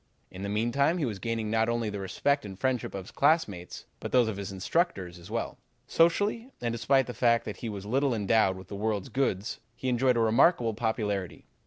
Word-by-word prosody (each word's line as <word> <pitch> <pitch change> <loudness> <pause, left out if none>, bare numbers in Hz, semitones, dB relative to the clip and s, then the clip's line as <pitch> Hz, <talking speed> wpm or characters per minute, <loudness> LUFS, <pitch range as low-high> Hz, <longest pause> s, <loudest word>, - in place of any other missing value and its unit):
In 90 - -9
the 100 - -3
meantime 120 - +1
he 160 - 0
was 105 -5 -4
gaining 115 -1 -2
not 110 0 +2
only 115 -2 -1
the 100 - -4
respect 140 +9 0
and 95 -2 -8
friendship 125 +1 -1
of 95 -2 -5
his - - -12
classmates, 135 - 0
but - - -6
those 125 -3 +4
of 110 - -2
the 100 - -5
instructors 95 - -1
as 85 +3 -13
well. 115 +1 -3 0.3
Socially, 205 - +2
and 120 -1 -1
despite 130 +3 +2
the 125 - -6
fact 115 -1 +2
that 105 - -5
he 115 - -5
was 100 -2 -6
little 130 +3 +1
endowed 105 -2 +2
with 95 -1 -12
this 100 - -6
world's 105 -2 -1
goods, 110 -7 -1 0.2
he 130 - -3
enjoyed 125 0 +2
a - - +2
remarkable 115 +2 +4
popularity. 105 -4 -2
115 Hz, 210 wpm, -28 LUFS, 100-130 Hz, 0.3 s, those